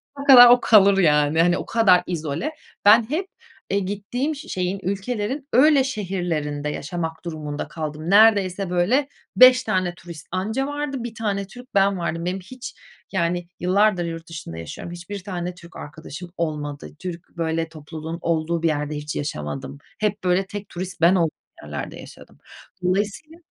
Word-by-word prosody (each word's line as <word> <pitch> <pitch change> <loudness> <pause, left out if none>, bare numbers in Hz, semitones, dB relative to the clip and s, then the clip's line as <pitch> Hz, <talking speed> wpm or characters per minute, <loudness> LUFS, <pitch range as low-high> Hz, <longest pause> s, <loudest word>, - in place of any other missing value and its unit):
sonuna 280 0 -7
kadar 245 -3 +11
o 245 0 +7
kalır, 200 -3 +6
yani, 150 -2 +3
hani, 175 +1 +3
o - - -5
kadar 190 -6 +4
izole. 160 - -3 0.3
Ben 220 +3 +6
hep, 355 +6 -2 0.4
eee, 200 - +1
gittiğim, 205 +10 -3
şeyin, 190 - -3
ülkelerin 210 - -3
öyle 280 +2 +6
şehirlerinde 175 - -3
yaşamak 160 +2 -5
durumunda 150 -3 -5
kaldım. 155 +1 -5
Neredeyse 200 -3 +4
böyle 215 +11 +2 0.3
5 255 0 +8
tane 185 -2 0
turist 170 -3 -11
anca 220 +9 -1
vardı. 290 -3 -4
1 235 -2 -6
tane 200 -3 -2
Türk 250 +2 -14
ben 195 -1 +3
vardım. 170 0 -3
Benim 185 +2 -2
hiç, 255 +8 -10 0.4
yani, 175 -2 -1
yıllardır 185 0 +2
yurt 165 0 -6
dışında 150 - -8
yaşıyorum. 80 - -7
Hiçbir 180 +3 -7
tane 180 -2 -4
Türk 170 -1 -15
arkadaşım 160 +3 -9
olmadı. 150 -3 -4
Türk 175 -1 -7
böyle 165 0 -1
topluluğun 160 +1 -7
olduğu 165 0 -1
bir 165 - +4
yerde 150 -1 -1
hiç 150 0 -5
yaşamadım. 130 - -5 0.2
Hep 210 -1 -1
böyle 180 +1 +2
tek 205 0 -7
turist 180 0 -7
ben 170 +3 +6
olduğum 165 -4 +1 0.3
yerlerde 75 -1 -6
yaşadım. - - -14 0.5
Dolayısıyla 205 - -1
180 Hz, 155 wpm, -23 LUFS, 165-210 Hz, 0.5 s, kadar